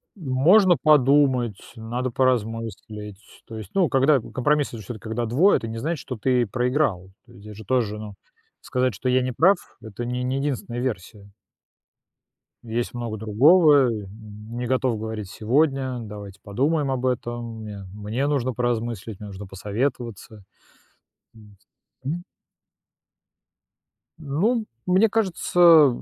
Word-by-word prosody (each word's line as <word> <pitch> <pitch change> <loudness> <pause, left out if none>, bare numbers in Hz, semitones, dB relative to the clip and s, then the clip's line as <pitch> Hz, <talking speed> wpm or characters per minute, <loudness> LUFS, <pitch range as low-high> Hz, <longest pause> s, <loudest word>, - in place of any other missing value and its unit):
Можно 175 +5 +4
подумать. 135 -6 +4 0.2
Надо 120 +3 -4
поразмыслить. 110 -4 -2 0.3
То 110 -1 -8
есть, 105 -3 -9
ну, 180 -7 +2
когда, 135 +2 +4
компромисс- 145 +5 0
это 115 - -8
же 110 - -9
всё-таки 110 +1 -8
когда 115 +2 -2
двое. 145 - +4
Это 115 - -6
не 115 0 -5
значит, 160 +3 -2
что 130 - -6
ты 125 +1 +2
проиграл. 120 -6 -1
То - - -20
есть - - -15
здесь 105 -1 -10
же 110 - -10
тоже, 110 -3 0
ну, 105 -1 -8 0.5
сказать, 125 -2 0
что 125 +7 -3
я 130 0 +3
не 130 0 -2
прав- 185 +11 +4 0.2
это 110 +2 -7
не 125 +1 -3
не 130 +2 -1
единственная 130 -4 -3
версия. 100 -4 -5 1.3
Есть 120 +2 -3
много 120 -3 -4
другого, 140 - +5
н 105 -3 -5 0.5
не 125 -1 -3
готов 130 -2 +1
говорить 110 -2 -5
сегодня, 130 +2 0
давайте 100 -3 -9
подумаем 140 +7 0
об 130 -1 -2
этом, 120 -2 -3
мне 100 -2 -8
мне 105 +6 -3
нужно 130 -3 0
поразмыслить, 115 -3 -3
мне 105 - -8
нужно 100 +1 -8
посоветоваться. 105 +1 -4 0.9
Вот. 105 -2 -17 0.5
Мгм. 165 +6 -4 1.9
Ну, 195 - 0 0.2
мне 190 +4 +4
кажется, 190 -5 -1
о 165 -4 +8
120 Hz, 140 wpm, -24 LUFS, 110-140 Hz, 1.9 s, о